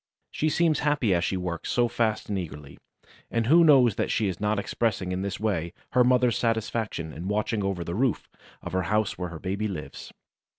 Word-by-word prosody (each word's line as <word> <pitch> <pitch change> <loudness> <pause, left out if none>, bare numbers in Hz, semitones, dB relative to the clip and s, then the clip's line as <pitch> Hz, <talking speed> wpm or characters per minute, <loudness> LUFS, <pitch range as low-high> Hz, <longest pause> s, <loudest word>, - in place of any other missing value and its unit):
She 155 - 0
seems 160 -1 +2
happy 145 -9 +1
as 85 -1 +1
she 95 - -1
works 90 -2 -4
so 120 -1 +3
fast 110 -2 -1
and 100 -2 -1
eagerly, 75 -5 -8 0.5
and 115 -1 0
who 165 +8 +6
knows 130 -9 +5
that - - 0
she 110 - +1
is 90 -3 -3
not 105 0 +1
expressing 100 -3 -1
in 90 0 -2
this 100 0 -3
way 90 -6 -1 0.2
her 125 -1 +5
mother's 125 -1 +3
satisfaction 110 -7 -2
in 85 +4 -6
watching 105 +1 -1
over 95 -3 -2
the 85 - -5
roof 120 +3 0 0.4
of - - -6
her 95 - +1
house 105 -2 0
where 90 -1 -3
her 80 - -7
baby 100 +5 -2
lives? 90 -7 -7
105 Hz, 205 wpm, -26 LUFS, 90-120 Hz, 0.5 s, who